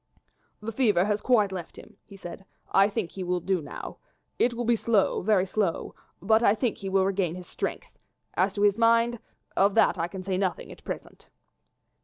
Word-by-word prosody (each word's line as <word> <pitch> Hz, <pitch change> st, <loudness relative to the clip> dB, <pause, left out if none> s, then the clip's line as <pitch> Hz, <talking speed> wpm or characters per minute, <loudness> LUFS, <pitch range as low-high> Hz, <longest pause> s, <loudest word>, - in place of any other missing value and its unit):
"The 220 Hz, +2 st, -4 dB
fever 210 Hz, -6 st, +3 dB
has 210 Hz, 0 st, 0 dB
quite 215 Hz, -6 st, +3 dB
left 180 Hz, -3 st, -7 dB
him," -, -, -14 dB
he 200 Hz, -, -14 dB
said; 175 Hz, 0 st, -9 dB, 0.3 s
"I 195 Hz, +1 st, +5 dB
think 205 Hz, -4 st, -3 dB
he 190 Hz, -, -6 dB
will 180 Hz, 0 st, 0 dB
do 185 Hz, 0 st, -1 dB
now. -, -, -8 dB, 0.4 s
It 240 Hz, 0 st, +2 dB
will 240 Hz, 0 st, -3 dB
be 235 Hz, +1 st, +3 dB
slow, 220 Hz, -3 st, +1 dB
very 195 Hz, -1 st, +3 dB
slow, 195 Hz, -3 st, -1 dB, 0.3 s
but 220 Hz, +4 st, +3 dB
I 215 Hz, -3 st, +4 dB
think 235 Hz, 0 st, -1 dB
he 195 Hz, -3 st, -5 dB
will 190 Hz, 0 st, +3 dB
regain 190 Hz, -3 st, 0 dB
his 180 Hz, -1 st, -9 dB
strength; -, -, -5 dB, 0.3 s
as 185 Hz, +3 st, +2 dB
to 205 Hz, -, -1 dB
his 205 Hz, +1 st, +3 dB
mind, 230 Hz, +1 st, +3 dB, 0.4 s
of 200 Hz, +1 st, +3 dB
that 220 Hz, -4 st, +4 dB
I 165 Hz, -, 0 dB
can 185 Hz, +1 st, -8 dB
say 185 Hz, -1 st, -1 dB
nothing 190 Hz, -2 st, -2 dB
at -, -, -13 dB
present." -, -, -8 dB
200 Hz, 200 wpm, -27 LUFS, 185-220 Hz, 0.4 s, I